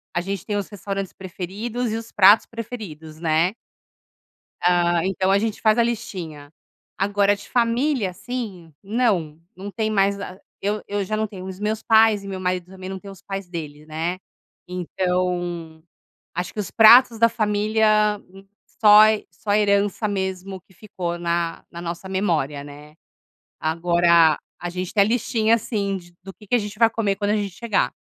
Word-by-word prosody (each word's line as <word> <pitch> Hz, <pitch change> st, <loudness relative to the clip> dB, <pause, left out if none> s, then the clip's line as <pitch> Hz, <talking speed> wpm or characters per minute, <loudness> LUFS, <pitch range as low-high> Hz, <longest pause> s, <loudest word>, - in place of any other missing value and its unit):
A 175 Hz, -, +1 dB
gente 195 Hz, -1 st, -5 dB
tem 210 Hz, -, -2 dB
os 200 Hz, -, -3 dB
restaurantes 195 Hz, -1 st, -5 dB
preferidos 205 Hz, +6 st, -4 dB
e 220 Hz, -, -1 dB
os 230 Hz, 0 st, -8 dB
pratos 205 Hz, +1 st, +6 dB
preferidos, 195 Hz, -10 st, -8 dB
né. 165 Hz, +3 st, +2 dB, 1.1 s
Ah, 175 Hz, -1 st, +3 dB
então 190 Hz, 0 st, 0 dB
a 195 Hz, -, +4 dB
gente 215 Hz, 0 st, -2 dB
faz 220 Hz, +1 st, +3 dB
a 235 Hz, -, +6 dB
listinha. 185 Hz, -11 st, -5 dB, 0.4 s
Agora, 200 Hz, +1 st, +2 dB
de 200 Hz, -, -12 dB
família, 240 Hz, -2 st, +1 dB
assim, 190 Hz, -6 st, -6 dB
não. 195 Hz, -8 st, 0 dB, 0.2 s
Não 195 Hz, +2 st, -7 dB
tem 220 Hz, +1 st, -2 dB
mais 200 Hz, -1 st, +2 dB
a 185 Hz, -1 st, -7 dB, 0.2 s
eu 205 Hz, +1 st, -2 dB
eu 205 Hz, 0 st, -1 dB
já 215 Hz, -, -3 dB
não 220 Hz, 0 st, 0 dB
tenho 190 Hz, -3 st, -9 dB
os 190 Hz, 0 st, -7 dB
meus 215 Hz, +1 st, -2 dB
pais 220 Hz, -2 st, +4 dB
e -, -, -7 dB
meu 190 Hz, -1 st, -5 dB
marido 180 Hz, -1 st, -1 dB
também 185 Hz, -1 st, -9 dB
não 190 Hz, 0 st, -5 dB
tem 200 Hz, +1 st, -11 dB
os 195 Hz, -, -13 dB
pais 195 Hz, -2 st, -6 dB
deles, 155 Hz, -3 st, -7 dB
né. 160 Hz, +3 st, -3 dB, 0.5 s
Então 175 Hz, -2 st, -2 dB, 0.5 s
acho 180 Hz, +2 st, -4 dB
que 215 Hz, -, -6 dB
os 200 Hz, -, -3 dB
pratos 235 Hz, +2 st, +7 dB
da 230 Hz, +1 st, +5 dB
família 215 Hz, -1 st, +2 dB, 0.6 s
só 210 Hz, -1 st, +9 dB, 0.3 s
só 205 Hz, +5 st, -3 dB
herança 205 Hz, 0 st, +2 dB
mesmo, 190 Hz, -1 st, -3 dB
que 190 Hz, -, -25 dB
ficou 175 Hz, -3 st, -5 dB
na 170 Hz, -1 st, -2 dB
na 170 Hz, -, -8 dB
nossa 175 Hz, +2 st, -6 dB
memória, 160 Hz, -7 st, -1 dB
né. 145 Hz, +1 st, -13 dB, 0.6 s
Agora 170 Hz, 0 st, +3 dB, 0.2 s
a 175 Hz, -, -4 dB
gente 180 Hz, 0 st, -5 dB
tem 210 Hz, -, +4 dB
a -, -, 0 dB
listinha 230 Hz, -1 st, +2 dB
sim 200 Hz, -3 st, -2 dB
de 175 Hz, -1 st, -15 dB
do 195 Hz, -, -8 dB
que 210 Hz, -, -17 dB
que -, -, -5 dB
a 240 Hz, -, +3 dB
gente 210 Hz, 0 st, -6 dB
vai 230 Hz, 0 st, +5 dB
comer 215 Hz, -3 st, -1 dB
quando 205 Hz, +1 st, -1 dB
a 215 Hz, -, +2 dB
gente 200 Hz, -3 st, -4 dB
chegar. 230 Hz, -2 st, 0 dB
195 Hz, 175 wpm, -22 LUFS, 175-215 Hz, 1.1 s, só